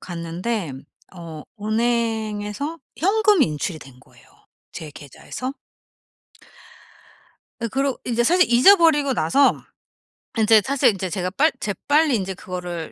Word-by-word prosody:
갔는데 175 - -4 0.4
어 165 -3 -9 0.2
은행에서 225 +4 -2 0.2
현금 410 0 +3
인출이 155 +2 -2
된 130 -3 -15
거예요 - - -22 0.4
제 155 -2 -8
계좌에서. 250 - -7 2.1
어 230 - -1
그러고 270 +3 -1
인제 240 -1 0
사실 355 +7 +4
잊어버리고 295 -1 +5
나서 240 - +3 0.9
인제 220 -1 +5
사실 275 -4 +3
인제 190 -2 -4
제가 180 0 -2
빨 305 +11 +2
재빨리 290 - +1
인제 190 -3 -3
그거를 180 -2 -6
220 Hz, 250 characters per minute, -22 LUFS, 180-280 Hz, 2.1 s, 잊어버리고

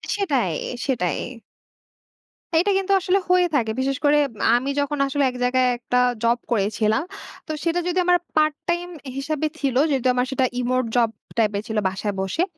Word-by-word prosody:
সেটাই, 275 - 0 0.3
সেটাই। 180 - 0 1.4
এটা 395 +4 +2
কিন্তু 390 0 -1
আসলে 375 +1 +2
হয়ে 360 0 +5
থাকে। 225 -6 +1
বিশেষ 270 +1 0
করে 290 +1 +5 0.4
আমি 260 +3 -3
যখন 285 +1 -1
আসলে 280 +1 0
এক 250 - -8
জায়গায় 255 +1 +3
একটা 245 +1 -2 0.3
জব 235 +1 +3
করেছিলাম। 215 +2 +1 0.4
তো - - -4
সেটা 335 +1 +1
যদি 360 +1 -1
আমার 355 0 +5 0.2
পার্ট 305 -1 +3
টাইম 345 +1 0 0.3
হিসাবে 310 +2 -1
ছিল, 270 -3 -1
যেহেতু 265 -3 +1
আমার 250 0 +1
সেটা 265 -1 +2
রিমোট 255 +1 0
জব 235 -2 +3 0.3
টাইপের 210 -2 +1
ছিল 220 - -3
বাসায় 200 +2 -3
বসে। 195 - 0
265 Hz, 160 wpm, -23 LUFS, 230-310 Hz, 1.4 s, হয়ে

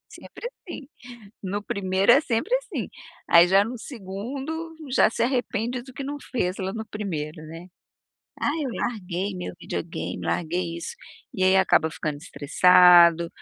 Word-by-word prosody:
Sempre 485 - -9
assim. 345 - -11 0.5
No 200 +2 -3
1º,, 190 0 +1
é 280 - +6
sempre 260 - -1
assim. - - -5 0.4
Aí, 170 +1 +8
já 195 +2 +5
no 240 +2 -6
2º, 270 - -6 0.2
já 250 - +4
se 230 - -2
arrepende 245 -1 -1
do 260 +1 -13
que 275 - -6
não 285 +2 -4 0.2
fez 185 -7 -1
lá 190 0 -3
no 220 +1 -6
1º, 160 -8 -5
né? 165 +3 -10 0.7
“Ah, 290 - +1
eu 265 - -2
larguei 195 -4 -3
meu 180 - -6
videogame, 165 0 -5
larguei 170 0 -2
isso.”. 170 - -6 0.4
E 185 - -2
aí 190 +1 +5
acaba 160 -4 +3
ficando 150 -2 -4
estressado. 170 +2 +5
195 Hz, 150 wpm, -24 LUFS, 175-245 Hz, 0.7 s, Aí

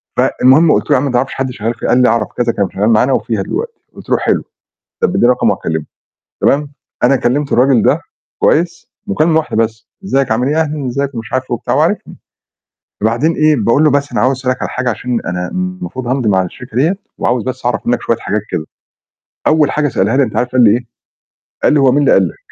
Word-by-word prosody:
فالمهم 150 +6 +4
قُلت - - 0
له: - - 0
"يا - - +5
عم 140 - -1
ما 140 - -1
تعرَفش 125 +2 0
حد 135 -1 -3
شغّال 115 -1 -3
فيه؟" 115 - -5
قال 125 - +3
لي: 125 - +4
"أعرَف 115 -2 +1
كذا 120 -1 +1
كان 100 -4 -1
شغال 105 +3 +1
معانا 115 +4 +3
وفيها 110 -5 -1
دلوقتي." 460 - -4 0.2
قُلت - - -13
له: - - +3
"حلو، - - 0 0.6
طَب 460 - +3
اديني 120 - +2
رقمه 125 0 +3
وهاكلمه." 80 -2 -3 0.6
تمام، 145 0 +1 0.3
أنا 135 +2 +4
كلّمت 135 +3 -1
الراجل 125 -1 +4
ده - - +2 0.4
كويس 170 +1 0 0.2
مكالمة 165 -5 +2
واحدة 155 - -3
بس، 115 0 -1 0.2
إزيّك 135 -8 0
عامل 125 +4 0
إيه، 155 +2 +1
أهلًا 150 -3 -2
إزّيك 140 +2 -2
ومش 115 -1 -7
عارف 130 0 0
إيه - - +1
وبتاع، 120 - -2
هو - - +2
عارفني، - - -1 0.9
وبعدين 120 +9 +1
إيه 155 -1 +3
باقول 115 +6 +2
له: 155 - +5
"بس 140 -1 0
أنا 110 - 0
عاوز 130 +2 +2
أسألك 130 -1 -2
على - - -2
حاجة 125 -1 -1
عشان 120 +1 -2
أنا 90 0 -3
المفروض 185 -8 -5
هامضي 125 -2 0
مع 95 -2 +3
الشركة 115 +6 -9
ديّة 160 +9 +2 0.2
وعاوز 120 -2 0
بس 130 -1 -5
أعرَف 125 - -1
منّك 120 0 0
شوية 115 - 0
حاجات 105 -1 -2
كده." 80 -3 -3 0.8
أوّل 155 -2 +3
حاجة 150 -1 0
سألها 110 +2 0
لي 140 - +4
أنت 110 - -4
عارف 125 - 0
قال 130 -1 +4
لي 110 - +6
إيه؟ 120 +3 0 0.8
قال - - +4
لي: 150 - +3
"هو 135 -2 +4
مين 135 - +1
اللي 145 - +3
قال 95 -2 +4
لك؟". - - -11
125 Hz, 230 wpm, -15 LUFS, 115-145 Hz, 0.9 s, لي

